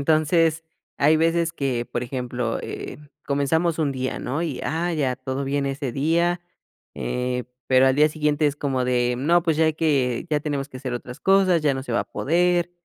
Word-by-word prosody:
Entonces, 160 +2 +2 0.3
hay 150 +3 +5
veces 165 +1 +1
que, 130 -6 -2
por 120 - -2
ejemplo, 125 -2 -3
eh, - - -7 0.3
comenzamos 160 +4 +1
un 150 -3 +1
día, 130 -1 -3
¿no? 140 +6 -3
Y, 155 -6 -3
ah, 170 +2 -1
ya 135 -6 0
todo 130 +1 -4
bien 140 +1 -1
ese 135 -2 -3
día, 170 +5 +1 0.5
eh, 125 - -2 0.2
pero 130 0 +5
al 130 - +4
día 150 +1 +5
siguiente 150 -1 +1
es 145 - -1
como 135 -3 -1
de, 125 -1 +1
no, 170 +6 +3
pues, 165 -3 +1
ya 160 - +3
hay 155 -1 +2
que, 135 -6 0
ya 150 -1 +2
tenemos 145 -2 -3
que 130 - -10
hacer 130 -1 -5
otras 125 +1 -7
cosas, 190 -4 +4
ya 145 -3 +2
no 130 - -4
se 125 - -5
va 120 - +2
a - - -3
poder, 175 +2 +1
145 Hz, 200 wpm, -23 LUFS, 130-160 Hz, 0.5 s, hay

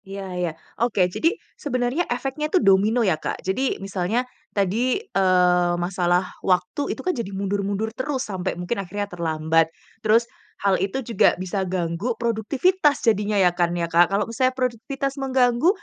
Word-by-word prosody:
Iya 195 0 -6
iya, 180 -2 -1 0.3
oke, 215 -6 +3
jadi 330 - +2 0.2
sebenarnya 255 +4 -1
efeknya 270 +5 -2
itu 370 - +3
domino 215 - +4
ya, 160 -5 +1
Kak. - - -3
Jadi 250 +8 0
misalnya 195 +6 -1 0.2
tadi, 215 +6 +1
eee, 180 - +2
masalah 175 0 +1 0.2
waktu 185 +7 0 0.2
itu - - -6
kan, 365 - +1
jadi 235 -7 -4
mundur-mundur 200 +2 -2
terus 260 +1 -2
sampai 190 -5 -3
mungkin 180 +5 -2
akhirnya 205 +2 -4
terlambat. 160 -1 +1 0.3
Terus 225 +2 +4 0.4
hal 195 -2 +3
itu 215 +7 -2
juga 230 -4 +3
bisa 185 +2 -3
ganggu 185 +6 -2
produktivitas 275 - +1
jadinya 210 -2 +2
ya, 180 -3 +4
kan 175 0 0
ya, 170 - 0
Kak. 170 +1 +4
Kalau 200 +1 +1
misalnya 255 +3 0
produktivitas 265 +3 -2
mengganggu 255 +2 +3
205 Hz, 155 wpm, -23 LUFS, 180-250 Hz, 0.4 s, domino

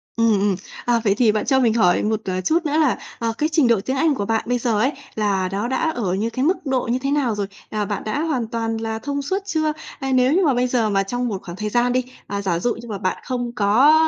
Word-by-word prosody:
Ừm, 230 -2 +3
ừm. 200 -1 +2 0.3
À, 240 -1 +3
vậy 200 -3 +3
thì 225 -1 +4
bạn 215 0 -1
cho 265 -1 +3
mình 235 -4 +3
hỏi 180 -6 +3
một, 215 0 0
ờ, 185 -1 -1
chút 325 - +1
nữa 300 0 +1
là, 300 -6 +3 0.2
à, 230 -1 -1
cái 305 - +1
trình 310 -5 +4
độ 230 -3 +4
tiếng 260 - -1
Anh 310 0 +3
của 200 - -2
bạn 225 +1 0
bây 245 0 +1
giờ 230 -3 0
ấy, 260 +6 +2 0.2
là 195 -3 0
nó 200 +4 -1
đã 320 +5 0
ở 215 - -2
như 210 +4 0
cái 255 +3 -1
mức 355 +1 0
độ 260 -2 0
như 250 - +1
thế 275 +2 -2
nào 270 -7 +1
rồi? 200 -1 -2 0.2
À, 210 -1 -1
bạn 205 -1 -3
đã 215 +7 -2
hoàn 280 -8 -1
toàn 225 -1 -2
là 225 0 -3
thông 285 +4 -3
suốt 375 +8 -1
chưa? 315 -5 0 0.3
À, 270 -2 -2
nếu 255 +1 +4
như 370 +2 +3
mà 285 - +3
bây 250 0 +1
giờ 240 -3 +1
mà 195 -1 +2
trong 245 +5 -2
một 200 -5 -3
khoảng 175 - -7
thời 210 +1 -2
gian 245 +2 +2
đi, 255 0 +1 0.2
à, 200 0 -3
giả 180 -4 0
dụ 240 +6 0
như 235 +1 -10
mà 210 -3 -4
bạn 185 -1 -1
không 245 -2 -3
có 230 +8 +5
235 Hz, 285 wpm, -21 LUFS, 210-265 Hz, 0.3 s, có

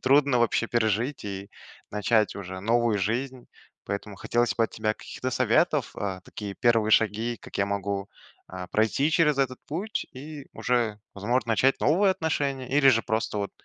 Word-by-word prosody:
трудно 135 -1 +4
вообще 115 0 +2
пережить 115 +3 0
и 100 0 -6 0.4
начать 105 +1 +2
уже 95 -1 -6
новую 115 0 +2
жизнь. 125 +5 -2 0.4
Поэтому 100 0 -4
хотелось 120 +4 0
бы 115 - +3
от - - -4
тебя 110 0 -1
каких-то 130 - -5
советов, 130 +3 +2
э, 95 -2 -3
такие 100 -2 -7
первые 115 -3 +2
шаги, 110 +2 +2
как - - -9
я 100 - +2
могу, 100 0 -2 0.4
э, 90 0 -6
пройти 115 +8 +2
через 150 -3 +3
этот 130 -2 0
путь 190 +9 -3
и 145 +2 -9
уже, 115 -4 0 0.2
возможно, 115 +4 0
начать 130 +5 +3
новые 190 +6 +4
отношения 140 -6 -2
или 135 0 +4
же, 115 -3 +5
просто, 110 -1 -1
вот, 100 - -2
115 Hz, 165 wpm, -26 LUFS, 105-135 Hz, 0.4 s, же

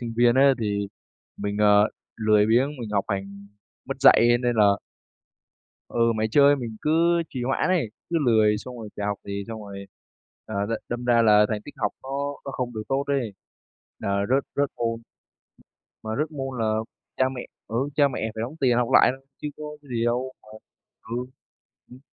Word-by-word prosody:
sinh 115 -2 -5
viên 120 0 +5
á 135 +1 +6
thì 100 -1 -1 0.5
mình, 100 0 -3
ờ, 105 0 +5 0.3
lười 105 -1 +3
biếng, 120 +5 +3
mình 110 -3 -5
học 100 -2 +1
hành 100 0 -5 0.4
mất 135 - -3
dạy, 135 - +7 0.2
nên 120 -1 +1
là 105 -2 +6 1.2
Ừ, 115 -1 +2
mải 110 - +1
chơi, 145 +2 +6
mình 120 -5 -6
cứ 170 +2 +3
trì 125 -2 -4
hoãn 130 +7 0
ấy, 170 - +1 0.2
cứ 170 - -1
lười 110 -2 +4
xong 125 +3 -9
rồi 110 -2 -8
chả 105 - -3
học 105 -1 -1
gì 100 0 -4
xong 110 -1 -6
rồi, 100 -1 -8 0.6
ờ, 110 - -6
đ - - -7 0.2
đâm 120 0 -4
ra 120 -1 +4
là 105 -1 +6
thành 105 -1 -2
tích 145 - -10
học - - 0
nó 130 - -9 0.4
nó 135 - -4
không 125 -2 -4
được 110 - -4
tốt 135 +1 0
ấy, 130 -7 -1 0.7
là 100 0 0
rớt 135 +2 +3
rớt 140 -1 +1
môn. 115 -1 -2 1.0
Mà 110 - -5
rớt 155 +1 0
môn 135 -3 -5
là 110 -1 +1 0.4
cha 130 - +3
mẹ, 130 -2 -6 0.2
ừ, 115 - -4 0.2
cha 145 -1 +5
mẹ 115 -4 -3
phải 110 - -4
đóng 130 +7 -5
tiền 125 -3 +3
học 120 -1 +1
lại - - +7
thôi 135 0 -24 0.2
chứ 150 - -2
có 155 - -8 0.3
gì 115 -1 -1
đâu 125 +2 -1
mà 110 - -19 0.5
ừ. 120 +3 -4 0.6
Ừm 125 - -12
115 Hz, 195 wpm, -25 LUFS, 105-130 Hz, 1.2 s, dạy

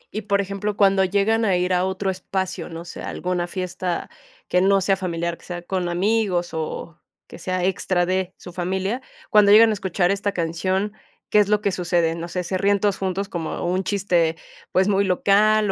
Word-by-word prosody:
Y 215 - -1
por 200 -1 +1
ejemplo, 200 +1 -3
cuando 195 -1 +4
llegan 200 +4 +2
a 195 -4 +2
ir 180 +1 0
a 180 0 +2
otro 190 +1 -1
espacio, 190 0 -4
no 165 0 -8
sé, - - -8
alguna 180 -1 -2
fiesta 180 -1 -4 0.4
que 180 - +2
no 195 +1 +4
sea 195 +1 +2
familiar, 170 -2 -3
que - - -18
sea 175 -1 -5
con 180 -1 -2
amigos, 185 -1 0
o 160 +1 -5 0.3
que - - -12
sea 185 -1 -2
extra 185 -1 +1
de 185 0 -1
su 180 - -11
familia, 190 +7 -2 0.3
cuando 210 -1 +6
llegan 220 +2 +8
a - - +1
escuchar 190 -2 0
esta 200 +1 -1
canción, 185 +4 -1 0.4
¿qué 210 - +5
es 205 -1 +3
lo 210 0 +2
que 200 -2 +1
sucede? 170 -2 +1
No 170 +1 -5
sé, 180 +1 -3
¿se 185 +1 -2
ríen 200 +1 +3
todos 200 -1 +1
juntos 195 +1 -2
como 170 -4 -4
un 185 +2 0
chiste, 180 -5 +1 0.4
pues, 185 +1 +3
muy 200 -1 +3
local, 205 +2 +3
190 Hz, 200 wpm, -22 LUFS, 175-200 Hz, 0.4 s, llegan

